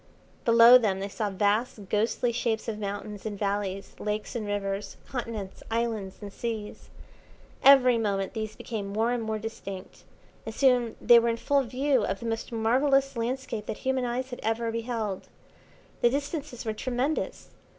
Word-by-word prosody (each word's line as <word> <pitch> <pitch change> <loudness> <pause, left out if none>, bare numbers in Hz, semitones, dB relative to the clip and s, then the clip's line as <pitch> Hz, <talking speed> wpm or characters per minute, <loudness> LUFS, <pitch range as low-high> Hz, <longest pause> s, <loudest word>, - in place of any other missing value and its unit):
Below 235 +1 +9
them 200 -5 0
they 195 - -3
saw 210 +1 -2
vast, 205 +1 0
ghostly 225 +3 +1
shapes 230 -1 -1
of 215 -2 -3
mountains 205 0 -5
and 210 -2 -4
valleys, 200 -1 -2
lakes 210 +2 -3
and 220 -3 -3
rivers, 200 0 -3
continents, 225 -6 -5
islands, 225 -4 -2
and 200 -1 -7
seas. 225 -3 -5 0.7
Every 255 -3 +7
moment 195 -3 -1
these 215 -1 -4
became 215 -4 -5
more 220 +4 0
and 245 -1 -1
more 220 -1 -2
distinct, 200 -3 -8 0.4
and 225 - -7
soon 250 -4 +3
they 240 -1 +7
were 235 0 +1
in 230 - 0
full 280 +4 +2
view 260 0 +1
of 195 - -2
the - - -7
most 225 +1 -3
marvellous 270 +5 +2
landscape 235 -2 -3
that - - -3
human 260 -1 +1
eyes 255 +2 -3
had 245 - -6
ever 225 +1 -1
beheld. 225 -4 -3 0.7
The 240 - +5
distances 280 -2 -4
were 220 - -1
tremendous. 255 +6 -2
225 Hz, 160 wpm, -28 LUFS, 210-245 Hz, 0.7 s, Below